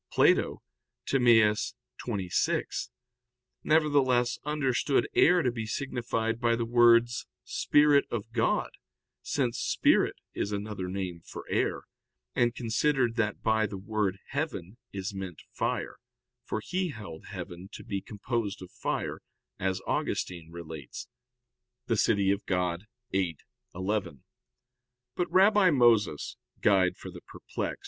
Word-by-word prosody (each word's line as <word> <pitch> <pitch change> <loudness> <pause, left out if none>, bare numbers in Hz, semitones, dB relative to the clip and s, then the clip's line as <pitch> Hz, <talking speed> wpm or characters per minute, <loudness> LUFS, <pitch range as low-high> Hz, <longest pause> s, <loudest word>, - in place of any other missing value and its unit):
Plato - - +3 0.4
(Timaeus 115 -5 +4 0.3
xxvi), 100 -7 -1 0.7
nevertheless, 140 -6 +3
understood 140 -2 +1
air 175 0 +5
to 125 - +2
be 115 -2 -5
signified 115 -2 -2
by 120 -1 +3
the 115 0 -1
words, 120 0 +4 0.2
"Spirit 145 -1 +4
of 115 -1 -4
God," 115 -1 +1 0.5
since 125 -5 -1
spirit - - +3 0.2
is 100 - -2
another 100 -2 -4
name 90 -2 -4
for - - -9
air, - - 0 0.5
and 120 -1 +2
considered 120 +1 +1
that 105 -2 -1
by 110 -1 +2
the 100 - -6
word 100 -1 -1
heaven 125 - -4
is 100 +1 -4
meant 95 -4 -7
fire, - - -2 0.5
for 110 - -3
he 185 0 -1
held 100 - -9
heaven 90 +2 -8
to - - -8
be 100 -1 -3
composed 105 -2 -3
of 90 - -12
fire, - - -3 0.4
as 95 -1 -1
Augustine 85 -3 -2
relates 80 -5 -8 0.8
(De 115 - +1
Civ. 100 - +3
Dei 95 -3 +1 0.4
viii, 95 -4 +1 0.4
11). 95 -7 -2 0.9
But 175 - -1
Rabbi 195 0 +6
Moses 115 - +3 0.3
(Perplex. 95 -3 -1
110 Hz, 115 wpm, -29 LUFS, 95-125 Hz, 0.9 s, Rabbi